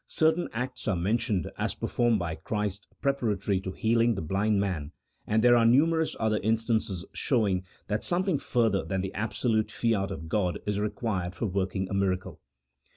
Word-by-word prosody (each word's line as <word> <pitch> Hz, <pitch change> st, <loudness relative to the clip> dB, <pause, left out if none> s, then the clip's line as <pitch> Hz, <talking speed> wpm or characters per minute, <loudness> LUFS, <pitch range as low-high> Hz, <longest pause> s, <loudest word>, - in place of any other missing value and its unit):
certain 160 Hz, +2 st, +2 dB
acts 125 Hz, +2 st, -4 dB
are 100 Hz, -, +2 dB
men 100 Hz, +7 st, +1 dB
tioned 100 Hz, -9 st, -1 dB
as -, -, -1 dB
performed 120 Hz, -2 st, +1 dB
by 85 Hz, -4 st, -2 dB
Christ 105 Hz, +2 st, -3 dB, 0.2 s
preparatory 105 Hz, -8 st, +1 dB
to 95 Hz, -, -4 dB
healing 115 Hz, +3 st, +2 dB
the 95 Hz, -, -3 dB
blind 100 Hz, +5 st, +1 dB
man, 85 Hz, -7 st, -2 dB, 0.3 s
and 110 Hz, +1 st, +2 dB
there 120 Hz, 0 st, +7 dB
are 120 Hz, -, +5 dB
numerous 160 Hz, +7 st, +3 dB
other 110 Hz, -1 st, +1 dB
instances 110 Hz, -4 st, 0 dB
show 115 Hz, -6 st, +1 dB
ing 95 Hz, -1 st, 0 dB, 0.2 s
that 105 Hz, 0 st, -2 dB
something 180 Hz, -3 st, +1 dB
further 115 Hz, -5 st, +1 dB
than 95 Hz, -1 st, -2 dB
the 95 Hz, 0 st, -4 dB
absolute 110 Hz, +1 st, 0 dB
fiat 110 Hz, -4 st, 0 dB
of 80 Hz, +1 st, -6 dB
God 90 Hz, 0 st, 0 dB
is 105 Hz, -1 st, -1 dB
required 105 Hz, -4 st, -2 dB
for -, -, -2 dB
working 95 Hz, -1 st, -1 dB
a -, -, -6 dB
miracle. 95 Hz, -2 st, -1 dB
105 Hz, 175 wpm, -28 LUFS, 95-115 Hz, 0.3 s, there